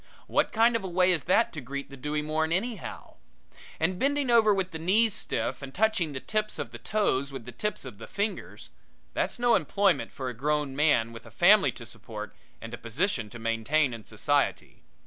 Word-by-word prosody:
What - - +1
kind 230 +1 +4
of 225 - -1
a - - -3
way 180 +1 +3
is 170 -5 0
that 210 +6 +3
to 150 - -5
greet 140 +2 -6
the - - -8
dewy 150 +3 -2
morn 160 +1 -1
anyhow? 205 +3 -4 0.6
And 180 +3 0
bending 280 -2 +1
over 225 -2 +6
with 190 -2 0
the 160 - -6
knees 205 +6 +3
stiff 130 -2 -2
and 135 0 -8
touching 215 -6 +2
the 135 - -4
tips 215 +7 -2
of - - -5
the - - -9
toes 140 -11 0
with 135 -4 -7
the 125 - -8
tips 210 +1 -3
of 115 -6 -9
the 115 - -9
fingers 205 +2 -4 0.4
that's - - -1
no 240 0 +3
employment 200 -1 +2
for 130 - -5
a 125 - -3
grown 145 +2 -1
man 130 -6 +2
with 115 0 -11
a - - -10
family - - +5
to - - -10
support - - -7 0.2
and 115 +1 -9
a 120 - -6
position 115 - -1
to 120 - -10
maintain 115 +5 +1
in 115 -2 -8
society. - - -1
155 Hz, 205 wpm, -28 LUFS, 130-205 Hz, 0.6 s, over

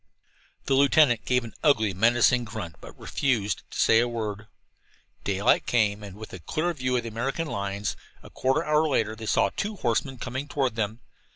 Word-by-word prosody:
The 135 - +1
lieutenant 135 -3 +4
gave 125 -1 +2
an 115 - -9
ugly, 110 -9 +3
menacing 120 +4 +3
grunt, 100 - -7
but - - -12
refused 110 - -1
to - - -7
say 115 - +5
a 120 - +2
word. 110 -3 -4 0.8
Daylight 100 +4 +2
came, 105 -3 +2
and 100 -2 -9
with 110 0 -10
it - - -5
a 80 - -20
clear 170 +3 -1
view 130 -4 -1
of 120 - -2
the 115 - -5
American 135 +8 -2
lines. 100 -6 -3 0.3
A - - -13
quarter 130 +1 +1
of - - -7
an 150 - 0
hour 155 +1 +4
later 110 -5 0
they 110 0 -8
saw 100 - +2
two 210 +1 -2
horsemen 130 - -1
coming 130 +4 -5
toward 135 -4 0
them. 110 +1 -3
115 Hz, 200 wpm, -26 LUFS, 105-135 Hz, 0.8 s, say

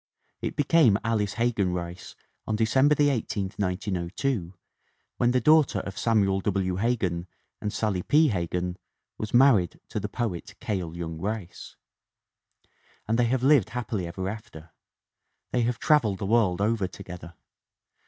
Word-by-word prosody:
It - - -3
became 145 -7 +4
Alice 105 -3 0
Hegan 110 -5 0
Rice 85 0 -6 0.3
on 110 - 0
December 130 +7 +3
18, 115 -9 0
1902, 95 +1 -2 0.6
when 120 - +3
the 125 +1 +3
daughter 150 +3 +4
of 100 - -7
Samuel 100 -4 +2
W. 95 -2 -1
Hegan 95 -6 -1 0.3
and 105 - -2
Sallie 100 -5 -1
P. 150 - +4
Hegan 90 -2 -2 0.4
was 105 - -4
married 120 -9 +4
to - - -3
the 105 0 -4
poet 110 -2 -4
Cale 90 -6 -3
Young 80 -2 -5
Rice. 100 -2 -5 1.3
And 115 +2 +1
they 120 - +4
have 125 +1 0
lived 135 -6 +4
happily 105 -7 -3
ever 95 +2 -4
after. 90 -6 -8 0.8
They 125 - +1
have 120 0 0
traveled 120 -11 +2
the 100 - -4
world 100 -4 +2
over 105 -2 +1
to 100 - -11
gether. 85 -2 -10
105 Hz, 145 wpm, -26 LUFS, 90-120 Hz, 1.3 s, became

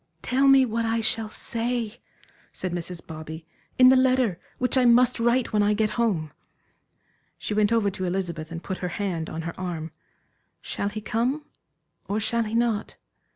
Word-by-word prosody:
"Tell 270 +2 +2
me 270 -1 +7
what 230 -1 -1
I 225 0 0
shall 220 -1 0
say," 235 0 -3 0.5
said 185 - -4
Mrs. 175 0 -5
Bobby 160 0 -8 0.3
"in 255 0 +8
the 260 - +7
letter 255 -8 +3 0.2
which 250 +1 +1
I 260 - +4
must 245 +1 +5
write 235 +1 +2
when 210 - +3
I 205 +1 +3
get 215 0 +1
home." 200 -10 0 1.1
She - - -4
went 210 0 +2
over 220 -3 +2
to 185 0 -4
Elizabeth 175 -3 -3
and 165 0 -6
put 190 - -4
her 180 - -2
hand 175 -6 -2
on 165 +1 -5
her 165 0 -4
arm. 165 -4 -4 0.7
"Shall 200 - -3
he 215 +1 -6
come, 250 +8 -1 0.6
or 205 +2 0
shall 230 +2 0
he 215 +1 -4
not? 230 -3 0
215 Hz, 175 wpm, -25 LUFS, 180-235 Hz, 1.1 s, in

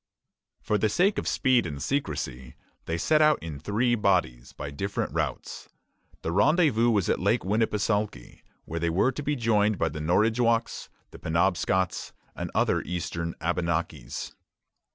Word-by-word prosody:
For 105 -1 +1
the 110 - +2
sake 195 - +2
of - - -5
speed 130 -8 +2
and 75 -3 -6
secrecy, 65 - -3 0.3
they 80 - -2
set 155 - +3
out 155 -1 +5
in 80 -4 -6
three 110 - +1
bodies, 90 - +1
by 70 - -7
different 100 +8 -3
routes. - - -4 0.5
The 80 - -2
rendezvous 120 - +3
was 105 -6 +2
at - - +1
Lake - - +1
Winnepesaukee, 105 0 -1 0.2
where 85 - -4
they 85 0 0
were 95 +10 +2
to 140 - -6
be 150 +1 -1
joined 110 -4 +2
by 85 - +1
the 75 - -6
Norridgewocks, 115 +7 +1 0.2
Penobscots, 90 +2 0 0.2
and - - -4
other - - +2
eastern 85 -1 -4
Abenakis. 85 -6 -2
100 Hz, 145 wpm, -27 LUFS, 85-115 Hz, 0.5 s, out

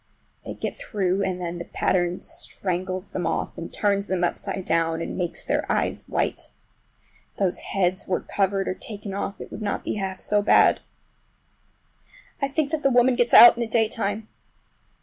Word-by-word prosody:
They - - -7
get - - -4
through, 195 -2 -1
and 185 -2 -1
then 175 -1 -4
the 170 - -6
pattern 175 -1 0
strangles 185 0 -4
them 175 -3 -2
off - - -2
and 170 - -7
turns 200 -1 0
them 180 -1 -1
upside 190 +1 -2
down, 165 0 +1
and 165 - -4
makes 175 -2 -4
their - - 0
eyes - - -1
white! - - -2 0.8
If - - -34
those 190 -3 0
heads 185 -1 -1
were 185 - 0
covered 195 -1 0
or - - 0
taken 200 0 -7
off 200 0 -4
it - - -9
would 210 - -7
not 205 -1 -2
be - - -3
half 190 -1 -4
so 210 0 +1
bad. 205 - +5 1.6
I 275 - +2
think 285 +1 -1
that 315 -2 -1
woman 245 +1 +5
gets 240 -1 +1
out 240 - +11
in 235 - -4
the 235 - -1
daytime! 220 -1 0
195 Hz, 175 wpm, -24 LUFS, 180-210 Hz, 1.6 s, out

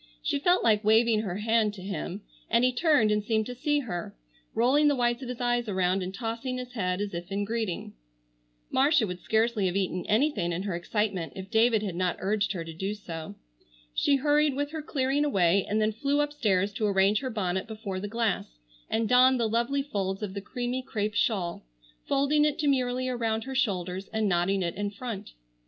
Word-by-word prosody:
She - - 0
felt 355 +5 +3
like 215 -1 +3
waving 220 +1 +4
her 190 -5 -4
hand 215 0 +1
to 185 - -10
him, 195 0 -5 0.3
and 235 +2 +3
he 255 0 +3
turned 250 -6 +3
and 210 0 +1
seemed 220 0 +1
to 250 - -5
see 295 +4 0
her; 175 -9 -5 0.4
rolling 260 +6 +4
the 290 - +3
whites 240 0 +1
of 255 - -6
his 250 - -5
eyes 240 -2 0
around, 185 0 +1
and 185 0 -4
tossing 230 +4 -4
his 250 0 -7
head 185 -5 -1
as 205 -1 -3
if 175 +3 -6
in 200 +1 -1
greeting. 220 -4 -3 0.8
Marcia 275 -2 +4
would 180 -2 -5
scarcely 220 0 +1
have 180 - -2
eaten 185 -2 -1
anything 215 - +1
in 175 +3 -3
her 200 -2 -2
excitement 190 -1 -2
if 190 0 -8
David 225 -1 +3
had 195 -4 -3
not 180 -1 0
urged 200 0 0
her 170 -3 -4
to 165 - -7
do 195 +5 -3
so. 165 - -7 0.6
She 280 - +3
hurried 295 +1 +2
with 290 +1 -2
her 315 -1 -4
clearing 280 -1 0
away, 195 -8 +2
and 210 +1 +1
then 215 0 +2
flew 280 +6 0
upstairs 215 -10 +1
to 215 +1 0
arrange 200 +1 +3
her 260 - -3
bonnet 190 -4 -2
before 215 -4 -5
the 205 - -4
glass 205 - -2 0.3
and 225 0 0
don 255 +2 +5
the 230 -2 +1
lovely 235 +5 0
folds 195 -6 -3
of 195 -2 -4
the 200 - -4
creamy 245 +4 -3
crêpe 215 -5 -3
shawl, 195 -6 0 0.4
folding 280 +2 +3
it 300 -1 +1
demurely 255 -3 +1
around 225 -3 -1
her 265 - -6
shoulders 190 -7 -1
and 220 -1 0
knotting 185 +1 +1
it 170 - -2
in 205 +1 -2
front. 205 -1 -7
220 Hz, 205 wpm, -28 LUFS, 195-255 Hz, 0.8 s, don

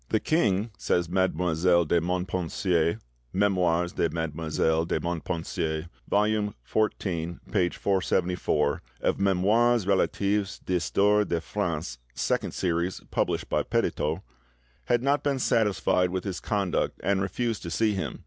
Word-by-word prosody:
"The 110 - +2
king," 110 - +1
says 85 +1 +1
Mademoiselle 90 -1 +2
de 85 +2 +2
Montpensier 90 -1 0 0.4
('Memoires 90 -3 +2
de - - +1
Mademoiselle 80 0 0
de 85 - -1
Montpensier', 85 -1 -3 0.2
vol. 105 +1 +3 0.4
xliii. 85 -6 -1 0.2
p. 90 -1 +2
474., 90 -6 0 0.2
of - - 0
'Memoires 100 +4 +3
Relatifs 100 +1 +1
d'Histoire 100 +4 +2
de 85 -4 -1
France', 80 -8 -3 0.2
Second - - -1
Series, 85 0 -1
published - - 0
by - - +1
Petitot), 75 +2 -1 0.6
"had 120 0 +1
not 140 +2 +2
been 140 -2 0
satisfied 105 -6 +2
with 95 0 -3
his 95 -3 -4
conduct 100 -4 -1
and 95 0 +1
refused 110 +4 -2
to 85 - -5
see 105 +6 +1
him. 95 - -4
90 Hz, 125 wpm, -27 LUFS, 85-100 Hz, 0.6 s, vol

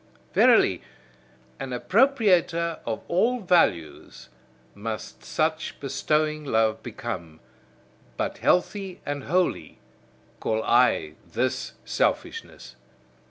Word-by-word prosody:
Verily, - - +5 0.8
an 135 - -5
appropriator 180 - +2
of 115 - -3
all 235 +8 +2
values 165 - 0 0.4
must 110 +1 -6
such 155 0 -2
bestowing 150 +3 0
love 110 -5 +1
become; 105 -9 -6 0.8
but - - -3
healthy 190 0 0
and 145 -2 -4
holy, 175 - 0 0.6
call 110 0 -1
I 75 0 +2
this - - -2
selfishness. 65 0 -2
150 Hz, 85 wpm, -25 LUFS, 110-180 Hz, 0.8 s, Verily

